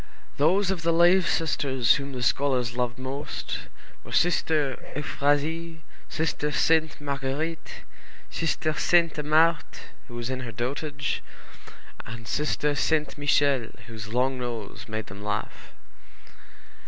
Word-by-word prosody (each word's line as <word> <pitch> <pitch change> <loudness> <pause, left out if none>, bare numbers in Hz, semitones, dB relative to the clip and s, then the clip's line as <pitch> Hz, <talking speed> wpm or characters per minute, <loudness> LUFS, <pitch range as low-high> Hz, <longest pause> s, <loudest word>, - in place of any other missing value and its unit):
Those 185 +7 +3
of 185 -3 -2
the 165 0 +2
lay 175 +3 +6
sisters 135 -7 +2
whom 140 0 -5
the 125 -1 -4
scholars 125 -4 +1
loved 125 -1 -1
most 135 +3 -5 0.4
were - - -11
Sister 155 -5 +1
Euphrasie, 155 +3 0 0.3
Sister 155 -2 -1
Sainte 160 0 +2
Marguérite, 145 +3 -3 0.5
Sister 155 -1 0
Sainte 165 -1 +3
Marthe, 155 +2 +2 0.2
who 120 - -10
was 120 +2 -3
in 130 - -2
her 120 -3 -5
dotage, 140 +5 -2 0.9
and 115 0 -8
Sister 150 +3 0
Sainte 150 0 +1
Michel, 140 -4 +3 0.2
whose 110 -2 -8
long 130 +2 +1
nose 120 -5 -5
made 110 -1 -3
them 100 +2 -10
laugh. 105 0 -4
145 Hz, 120 wpm, -26 LUFS, 125-160 Hz, 0.9 s, lay